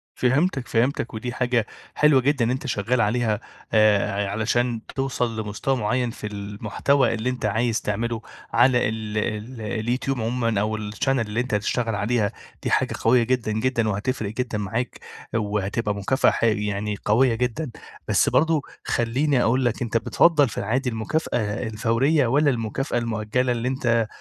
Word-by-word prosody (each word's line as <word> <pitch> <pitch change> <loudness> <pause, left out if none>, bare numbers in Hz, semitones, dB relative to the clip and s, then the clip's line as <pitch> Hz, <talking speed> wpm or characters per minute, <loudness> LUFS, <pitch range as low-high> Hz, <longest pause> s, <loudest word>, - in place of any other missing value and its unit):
فهمتك، 135 +1 +1
فهمتك، 120 +1 0
ودي 120 +3 -4
حاجة 125 -3 +1 0.3
حلوة 150 -3 +5
جدًا 135 -2 +2
إن 115 - +1
أنت 135 +2 -3
شغال 120 +2 0
عليها، 110 -1 +1 0.3
آآ، 105 -1 +3
ع - - -4
علشان 115 +2 0
توصل 125 -4 -1
لمستوى 105 +6 -1
معين 125 +1 0
في 105 - -7
المحتوى 105 +6 0
اللي 115 +3 -1
أنت 125 -3 -3
عايز 110 +2 +1
تعمله 115 +2 -2 0.3
على 125 -1 +4
ال 110 -1 -4
ال 110 +3 -3
اليوتيوب 120 +4 -2
عمومًا 115 -2 0
أو 110 +1 -1
الchannel 105 -1 -5
اللي 115 -4 +1
أنت 125 -1 -2
هتشتغل 115 +2 0
عليها، 105 0 0 0.3
دي - - -1
حاجة - - +2
قوية 120 +1 +4
جدًا، 125 -2 0
جدًا، 115 0 0
وهتفرق 105 +1 -2
جدًا 125 -2 -2
معاك 110 +5 -3 0.4
وهتبقى 105 0 -1
مكافأة 100 +7 +2
ح - - -3
يعني 105 -1 0
قوية 115 +3 +4
جدًا، 125 +4 -2 0.4
بس - - +3
برضو 160 -1 +3 0.2
خلّيني 125 +3 +1
أقول 130 +3 +2
لك 120 0 0
أنت 115 -1 0
بتفضّل 145 +3 +3
في - - -9
العادي 125 +5 0
المكافأة 115 +6 -1 0.3
الفورية 120 +6 +2
والّا 145 +4 +3
المكافأة 120 +2 -1
المؤجلة، 115 +2 0
اللي 120 +1 -1
أنت 120 -4 +1
115 Hz, 155 wpm, -24 LUFS, 110-125 Hz, 0.4 s, حلوة